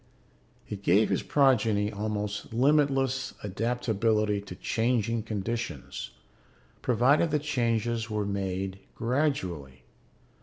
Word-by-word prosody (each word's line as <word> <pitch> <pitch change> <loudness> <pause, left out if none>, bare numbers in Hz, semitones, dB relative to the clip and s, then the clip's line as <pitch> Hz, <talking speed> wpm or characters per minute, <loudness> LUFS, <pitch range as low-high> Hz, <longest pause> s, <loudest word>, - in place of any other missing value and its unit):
It 100 -2 -6
gave 100 +3 +4
his - - +1
progeny 110 -7 +3
almost 105 -1 -3
limitless 135 +1 +2
adaptability 110 -1 0
to 100 -3 -9
changing 115 +1 0
conditions, 110 - -4 0.7
provided 130 +7 +3
the 150 - +2
changes 115 -5 0
were 105 -1 -1
made 95 -1 -3 0.2
gradually. 100 - -1
110 Hz, 90 wpm, -28 LUFS, 100-125 Hz, 0.7 s, gave